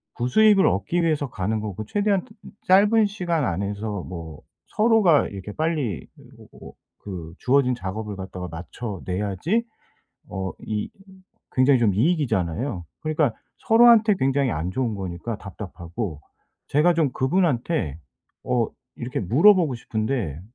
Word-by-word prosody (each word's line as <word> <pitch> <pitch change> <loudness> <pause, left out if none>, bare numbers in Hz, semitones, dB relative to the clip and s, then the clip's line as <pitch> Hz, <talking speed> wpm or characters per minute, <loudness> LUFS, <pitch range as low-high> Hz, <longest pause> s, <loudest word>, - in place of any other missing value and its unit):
부수익을 195 - +4
얻기 100 - 0
위해서 150 -4 0
가는 110 +1 -2
거고 105 0 -5
최대한 200 - 0 0.4
짧은 210 +4 +5
시간 175 -7 -1
안에서 100 +2 -3
뭐 80 -4 -8 0.3
서로가 215 -8 +4
이렇게 100 +1 -8
빨리 150 - -2
으 - - -15 0.4
어 - - -8
어 - - -15 0.3
그 85 -5 -7
주어진 130 0 +3
작업을 105 -1 -5
갖다가 95 -1 -6
맞춰 95 +5 -7
내야지 105 - -1 0.6
어 95 0 -4
이 105 -1 -3 0.6
굉장히 130 +1 +4
좀 110 -5 +2
이익이잖아요. 115 - 0 0.2
그러니까 155 -5 +1 0.3
서로한테 225 -2 +6
굉장히 135 0 +1
안 85 -1 -2
좋은 120 -2 -1
거니까 95 +4 -5
답답하고 90 -3 -6 0.5
제가 160 +5 +3
좀 160 -4 +2
그분한테 140 - 0 0.5
어 120 -2 +1 0.3
이렇게 125 +4 -4
물어보고 160 - +4
싶은데 110 - -3
120 Hz, 295 characters per minute, -24 LUFS, -, 0.6 s, 서로한테